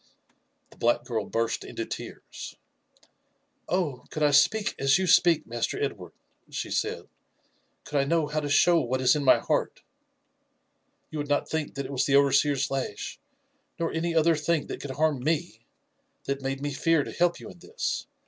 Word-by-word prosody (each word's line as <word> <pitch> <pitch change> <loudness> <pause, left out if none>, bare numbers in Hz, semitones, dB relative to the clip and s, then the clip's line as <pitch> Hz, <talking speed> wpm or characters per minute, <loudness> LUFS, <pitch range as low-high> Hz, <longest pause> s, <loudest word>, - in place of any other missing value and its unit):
The - - -18
black 120 0 +2
girl 115 -4 -2
burst 115 0 -1
into - - -5
tears. - - -8 0.5
'' - - -33
Oh! 165 -9 -1
could 155 - -3
I 145 - +4
speak 210 +10 +3
as 135 +2 +4
you 190 - 0
speak. 170 -2 +4
Master 120 0 -3
Edward," - - -4 0.4
she - - -5
said, - - -2 0.4
>« - - -43
could 145 - -1
I - - +3
know 165 +2 +2
how 150 +1 -2
to 145 -1 -4
show 170 +4 +5
what 130 -2 -1
is 130 +3 +4
in 150 - -1
my 130 - +6
heart, - - -2 0.6
— - - -47
you 155 - -4
would 145 0 -4
not 145 - +1
think 160 -2 -3
that 140 0 -3
it 130 - -7
was 130 -2 0
the 140 - +3
overseer's 140 0 +3
lash, 135 -6 -4 0.6
nor 165 -1 -2
any 165 +1 -1
other 165 +1 +4
thing 155 +1 0
that - - -7
could 145 - -6
harm 145 -1 0
fne, 145 -8 -1 0.6
that 140 0 -3
made 135 0 -3
me 145 -1 -2
fear 165 +1 +2
to - - -7
help 175 0 +1
you - - -9
in 175 - -17
this. 455 - -4
145 Hz, 190 wpm, -27 LUFS, 135-165 Hz, 0.6 s, my